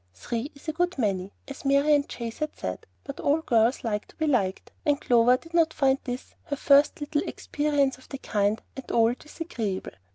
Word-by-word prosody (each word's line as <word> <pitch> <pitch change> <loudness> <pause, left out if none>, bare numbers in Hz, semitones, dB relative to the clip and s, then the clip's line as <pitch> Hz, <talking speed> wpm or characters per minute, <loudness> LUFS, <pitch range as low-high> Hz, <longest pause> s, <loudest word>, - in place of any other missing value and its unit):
"Three 230 - -4
is 280 - -16
a 315 - -1
good 355 +1 0
many," 195 -5 -1 0.2
as 275 - -8
Marian 280 +1 +4
Chase 230 -2 -6
had 305 -1 -3
said, 95 0 -5 0.2
but - - -8
all 295 +3 +2
girls 235 -2 +2
like 210 -3 -2
to - - -19
be 315 - -1
liked, 205 -10 0
and 290 -1 +2
Clover 245 -2 +4
did 330 +5 -17
not 330 -2 +3
find 270 -1 +3
this, 245 -1 -5
her 290 - -2
first 280 +1 +4
little 295 0 0
experience 290 -6 0
of - - -19
the 275 - -5
kind, 210 -3 0
at 265 - -8
all 230 0 +4
disagreeable. 245 - -5
270 Hz, 195 wpm, -27 LUFS, 230-295 Hz, 0.2 s, Marian